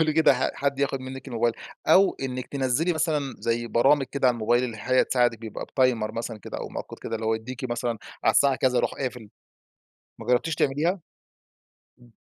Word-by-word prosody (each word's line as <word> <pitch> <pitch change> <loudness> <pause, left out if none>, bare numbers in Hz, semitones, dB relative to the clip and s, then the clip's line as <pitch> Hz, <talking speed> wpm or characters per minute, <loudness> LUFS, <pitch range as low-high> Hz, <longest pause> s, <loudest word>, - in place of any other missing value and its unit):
بتقولي 155 -1 +3
كده 140 -5 +4
حد 140 -1 -1
ياخد 135 -1 0
منِّك 130 +1 -8
الموبايل؟ 120 -1 +1 0.3
أو 195 +1 +5
إنِّك 130 -1 -3
تنَزِّلِي 140 +5 0
مثلًا 155 -3 -1
زي 115 0 -1
برامج 135 +5 +4
كده 140 -2 0
على 125 - +2
الموبايل 120 +2 +2
اللي 115 -3 -5
هي 130 +4 +3
تساعدك، 120 -3 +2
بيبقى 110 -2 -6
بتايمر 125 -5 +1
مثلًا 115 -1 -5
كده - - -7
أو - - -5
مؤقت - - -7
كده، 115 - -4
اللي 110 0 -3
هو 110 - +2
يديكي 130 +4 -5
مثلًا 120 -1 -2 0.3
على - - +6
الساعة 140 -2 +4
كذا 130 -1 +1
يروح - - +1
قافل، 125 -5 -5 0.9
ما - - -9
جرّبتيش 125 +6 +2
تعمليها؟ 155 +8 +1 1.0
إمم. 120 -1 -19
130 Hz, 185 wpm, -26 LUFS, 120-140 Hz, 1.0 s, على